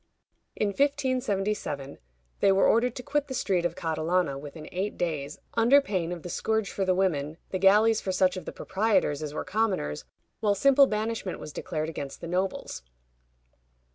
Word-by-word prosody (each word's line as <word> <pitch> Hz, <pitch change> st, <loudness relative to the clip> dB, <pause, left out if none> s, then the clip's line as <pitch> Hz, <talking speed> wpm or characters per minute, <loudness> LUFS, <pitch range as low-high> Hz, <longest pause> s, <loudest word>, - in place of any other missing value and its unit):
In 210 Hz, -, 0 dB
1577 210 Hz, -, -1 dB, 0.4 s
they 195 Hz, -, +5 dB
were 195 Hz, 0 st, +4 dB
ordered 240 Hz, +1 st, +3 dB
to 250 Hz, -, -6 dB
quit 295 Hz, +1 st, -1 dB
the 260 Hz, -, -5 dB
street 185 Hz, -7 st, 0 dB
of 170 Hz, -1 st, -1 dB
Catalana 165 Hz, -1 st, 0 dB
within 150 Hz, +2 st, -9 dB
eight 190 Hz, +3 st, -3 dB
days, 150 Hz, -4 st, -3 dB, 0.2 s
under 235 Hz, +5 st, +6 dB
pain 185 Hz, -10 st, -2 dB
of 175 Hz, -2 st, -6 dB
the 175 Hz, -, -6 dB
scourge 220 Hz, -2 st, -1 dB
for 195 Hz, -, -2 dB
the 185 Hz, -1 st, +2 dB
women, 160 Hz, -5 st, 0 dB
the 185 Hz, -, -1 dB
galleys 210 Hz, +3 st, +5 dB
for 190 Hz, -, -2 dB
such 185 Hz, 0 st, +2 dB
of 185 Hz, -, -6 dB
the -, -, -5 dB
proprietors 190 Hz, -7 st, 0 dB
as 150 Hz, -2 st, -4 dB
were -, -, -3 dB
commoners, 190 Hz, -, -1 dB, 0.4 s
while 205 Hz, -2 st, +2 dB
simple 275 Hz, +5 st, +5 dB
banishment 215 Hz, -3 st, -2 dB
was 150 Hz, -, -8 dB
declared 155 Hz, 0 st, -3 dB
against 140 Hz, -4 st, -6 dB
the 170 Hz, -, -7 dB
nobles. 185 Hz, +3 st, -2 dB
190 Hz, 170 wpm, -27 LUFS, 165-220 Hz, 0.4 s, under